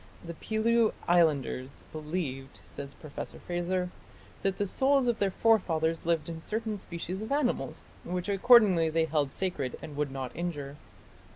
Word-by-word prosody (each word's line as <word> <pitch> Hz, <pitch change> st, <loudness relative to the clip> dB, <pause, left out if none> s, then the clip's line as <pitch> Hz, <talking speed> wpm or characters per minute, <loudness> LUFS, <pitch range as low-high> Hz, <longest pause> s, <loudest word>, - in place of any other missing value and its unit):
"The 170 Hz, -, -5 dB
Pelew 220 Hz, +5 st, +2 dB
Islanders 145 Hz, -6 st, +2 dB
believed", 150 Hz, -4 st, -4 dB
says 140 Hz, 0 st, -9 dB
Professor 155 Hz, -3 st, -8 dB
Frazer, 180 Hz, +1 st, -2 dB, 0.5 s
"that 195 Hz, -1 st, 0 dB
the 205 Hz, -, 0 dB
souls 265 Hz, +5 st, +2 dB
of 240 Hz, -2 st, +1 dB
their 200 Hz, -, +2 dB
forefathers 165 Hz, -7 st, +2 dB
lived 165 Hz, -2 st, +1 dB
in 165 Hz, -1 st, -6 dB
certain 215 Hz, +2 st, -2 dB
species 180 Hz, +2 st, -5 dB
of 220 Hz, -, -6 dB
animals, 280 Hz, -3 st, 0 dB, 0.2 s
which 180 Hz, +1 st, -3 dB
accordingly 200 Hz, -5 st, +6 dB
they 160 Hz, +1 st, +2 dB
held 150 Hz, -4 st, 0 dB
sacred 165 Hz, -9 st, -2 dB
and 150 Hz, -, -8 dB
would 145 Hz, -1 st, -1 dB
not 135 Hz, -2 st, -5 dB
injure. 145 Hz, -5 st, -4 dB
175 Hz, 150 wpm, -30 LUFS, 155-205 Hz, 0.5 s, accordingly